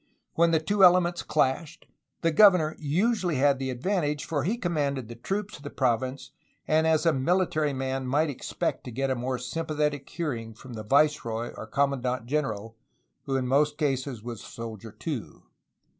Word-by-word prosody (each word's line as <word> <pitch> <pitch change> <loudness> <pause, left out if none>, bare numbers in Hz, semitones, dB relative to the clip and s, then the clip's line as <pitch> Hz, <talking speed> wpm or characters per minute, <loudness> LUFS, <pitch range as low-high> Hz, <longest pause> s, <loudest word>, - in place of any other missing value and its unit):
When 170 +1 +4
the 165 -1 +3
two 195 +5 +1
elements 175 -1 +5
clashed, 155 +4 -1 0.4
the 165 - +2
governor 165 -3 +6
usually 180 +4 +1
had 135 0 +3
the 135 -1 -2
advantage, 150 +2 -1
for 145 -4 -1
he 210 +9 0
commanded 145 - -1
the 120 - -7
troops 195 - -4
of 145 - -16
the 145 - -5
province 130 +1 -1 0.4
and 160 +1 +3
as 160 +1 +2
a 165 - +4
military 155 +1 +1
man 130 -1 -3
might 150 +5 +2
expect 135 - -3
to 125 - -6
get 135 +3 -1
a - - +1
more 130 +1 -2
sympathetic 150 +1 -2
hearing 115 -10 -4
from 125 +2 -11
the 110 - -5
viceroy 120 -2 +1
or - - -8
commandant 130 -4 0
general, 115 -6 -2 0.5
who 135 - 0
in 130 -1 0
most 145 +3 +2
cases 135 -6 -1
was 120 -3 -6
a - - -11
soldier, 115 -1 -8
too. 135 - -6
145 Hz, 175 wpm, -27 LUFS, 130-160 Hz, 0.5 s, governor